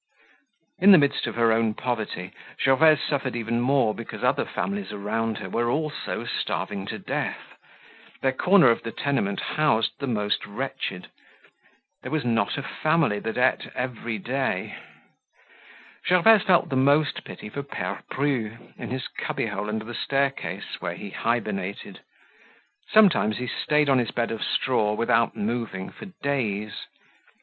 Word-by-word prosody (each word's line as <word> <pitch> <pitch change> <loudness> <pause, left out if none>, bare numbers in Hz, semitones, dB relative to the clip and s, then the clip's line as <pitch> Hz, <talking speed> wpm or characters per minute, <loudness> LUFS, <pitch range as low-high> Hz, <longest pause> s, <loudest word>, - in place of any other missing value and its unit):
In 195 +3 +8
the - - +10
midst 140 -4 +2
of 115 - -4
her 115 -1 +3
own 110 -1 +2
poverty 110 -7 -3 0.3
Gervaise 150 +3 +5
suffered 135 -4 -1
even 115 0 -1
more 130 -3 +3
because 115 0 -8
other - - +2
families 200 0 -3
around 110 +2 -2
her - - -6
were 120 +5 0
also 155 +4 -2
starving 95 -1 -3
to - - -4
death. - - -4 0.7
Their 135 - +3
corner 175 -1 +5
of 115 - 0
the 115 - -5
tenement 130 -9 -1
housed 145 -8 +1
the 140 - -3
most 105 -4 0
wretched. 105 -4 -5 0.9
There - - -7
was 155 -5 -1
not 115 -2 +1
a 140 - -3
family 155 -8 +1
that 110 +2 -4
ate 125 +1 +2
every 120 -3 -3
day. 125 -2 -2 1.3
Gervaise 195 +4 +6
felt 180 -2 +3
the 135 - -1
most 140 +3 +3
pity - - -9
for 140 - -4
Pere 100 -9 -5
Bru 125 -6 -1 0.2
in - - -5
his 130 +1 -3
cubbyhole 105 - -3
under 110 0 -3
the 120 - -7
staircase 135 +3 -2
where - - -3
he - - -8
hibernated. - - -2 0.9
Sometimes 190 - +5
he 125 - -3
stayed 150 +4 +1
on 135 -2 +4
his 120 -3 0
bed 120 -1 -1
of 115 - -4
straw 105 -5 +1
without 115 0 +2
moving 110 -3 -3
for - - -11 0.2
days. 110 -7 -2
120 Hz, 150 wpm, -25 LUFS, 110-140 Hz, 1.3 s, the